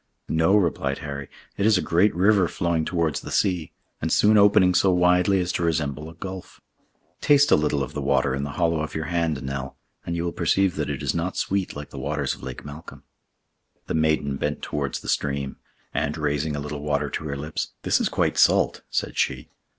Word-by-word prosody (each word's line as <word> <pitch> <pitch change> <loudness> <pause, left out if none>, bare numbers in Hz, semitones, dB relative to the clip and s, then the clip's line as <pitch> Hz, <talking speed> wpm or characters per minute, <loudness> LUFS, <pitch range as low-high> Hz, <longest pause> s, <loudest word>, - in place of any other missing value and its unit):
"No," 80 +5 +3
replied 75 -7 0
Harry, 70 -1 -6 0.3
"it 100 - +1
is 110 -3 +5
a - - 0
great 90 +4 +2
river 95 0 +4
flowing 85 -2 -1
towards 80 -4 0
the - - -8
sea, 90 -5 0 0.3
and 80 - -1
soon 105 +1 +5
opening 100 -3 +5
so 95 +2 +4
widely 90 +2 +3
as 90 0 -1
to 85 - -2
resemble 75 -2 -1
a 85 - -13
gulf. 95 +1 -8 0.6
Taste 145 -1 +4
a - - +8
little 75 -2 +1
of 65 - -7
the 75 - -3
water 70 -1 +1
in 70 - -2
the 70 - -5
hollow 85 -2 +1
of 80 - -5
your 80 0 -2
hand, 80 -5 0
Nell, 65 0 -5 0.3
and 85 - -3
you 85 - -2
will 85 - -1
perceive 95 0 +1
that 75 - -2
it 70 -4 -4
is - - 0
not 85 +2 -2
sweet 100 -1 -1
like 75 0 -8
the 70 - -7
waters 75 0 -1
of - - -11
Lake 65 +1 -7
Malcolm." 75 +3 -10 0.8
The - - -4
maiden 75 -3 +1
bent - - -3
towards 70 -3 -3
the - - -11
stream, 70 -1 -1 0.4
and, 75 +3 -1
raising 75 0 -1
a - - -3
little 75 0 -5
water 75 -1 -1
to - - -4
her 70 -2 -3
lips, 75 +3 -4
"This - - +2
is - - +1
quite - - 0
salt," - - +3
said - - -2
she. - - -1
80 Hz, 210 wpm, -24 LUFS, 70-90 Hz, 0.8 s, a